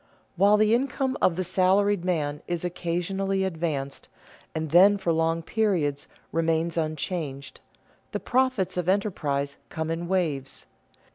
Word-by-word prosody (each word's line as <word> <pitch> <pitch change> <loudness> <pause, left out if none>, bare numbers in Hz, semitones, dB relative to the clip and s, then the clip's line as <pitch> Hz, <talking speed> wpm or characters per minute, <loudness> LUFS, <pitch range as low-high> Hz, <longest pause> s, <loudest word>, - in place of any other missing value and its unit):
While 200 +3 +5
the 215 +1 +4
income 265 +1 0
of 170 - +3
the 185 - -1
salaried 190 +2 +2
man 150 -5 -1
is 175 0 -2
occasionally 185 +3 -1
advanced, 160 -6 -3 0.5
and 160 -2 -3
then 195 +4 +7
for 190 -4 0
long 165 +1 +1
periods 170 -10 0 0.2
remains 165 0 0
unchanged, 155 -3 -3 0.5
the - - -2
profits 255 -8 0
of 180 0 0
enterprise 150 -8 -1
come 160 0 -3
in 170 +1 -3
waves. 155 -8 -2
175 Hz, 130 wpm, -26 LUFS, 160-195 Hz, 0.5 s, then